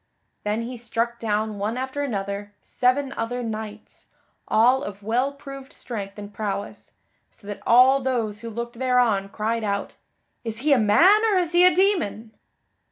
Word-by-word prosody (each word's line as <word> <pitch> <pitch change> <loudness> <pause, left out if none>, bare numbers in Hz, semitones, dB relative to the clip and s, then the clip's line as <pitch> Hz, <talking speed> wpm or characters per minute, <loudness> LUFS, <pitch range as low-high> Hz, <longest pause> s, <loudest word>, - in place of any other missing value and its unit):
Then 210 +2 -1
he 245 +1 -6
struck 235 0 -2
down 215 -1 -1
one 215 +4 -2
after 265 +2 -3
another, 205 -5 -4
seven 265 +2 0
other 245 +2 -3
knights, 215 -1 -7 0.4
all 245 +5 +4
of 205 -5 -7
well 245 +6 +1
proved 275 -1 -10
strength 200 -5 -7
and 205 0 -9
prowess, 200 -1 -5 0.4
so - - -19
that 205 0 -7
all 255 +3 +6
those 230 -5 -1
who 230 - -6
looked 235 +1 -6
thereon 245 -6 +2
cried 220 +2 -2
out, 200 -1 -3 0.5
"Is 225 -1 -4
he 295 +1 +4
a 265 - +4
man 345 - +5
or 430 -3 +2
is 350 -3 0
he 350 0 +5
a 365 - +3
demon?" 345 - +1
230 Hz, 165 wpm, -24 LUFS, 210-260 Hz, 0.5 s, all